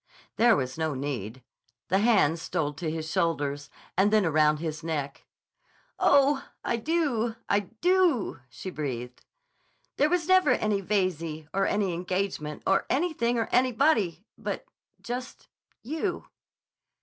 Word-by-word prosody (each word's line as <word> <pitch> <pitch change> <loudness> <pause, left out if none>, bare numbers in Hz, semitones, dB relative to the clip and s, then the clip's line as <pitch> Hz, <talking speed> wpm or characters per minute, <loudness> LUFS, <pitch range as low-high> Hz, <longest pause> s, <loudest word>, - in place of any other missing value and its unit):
There 230 0 +6
was 130 0 -3
no 160 -3 -1
need. 130 -4 -4 0.5
The 190 - +3
hands 195 -8 +3
stole 160 -5 -2
to 160 +2 -4
his 160 0 -4
shoulders, 145 -4 -1 0.3
and 195 +3 +3
then 215 -3 +4
around 155 -1 +3
his 160 0 -5
neck. 145 -4 -4 0.7
"Oh, 280 0 +4 0.2
I 235 - 0
do! 240 -5 0
I 200 - +3 0.2
do!" 350 - +2
she 185 +9 -7
breathed. 125 -6 -5 0.7
"There 295 - +3
never 360 +2 +4
was - - 0
any 210 -2 0
Veyze, 170 -6 -1
or 195 0 +2
any 200 -3 0
engagement, 180 -3 -3
or 195 - +2
anything 265 -6 +1
or 225 - 0
anybody—but—just—you." 250 - -2
190 Hz, 120 wpm, -27 LUFS, 155-240 Hz, 0.7 s, There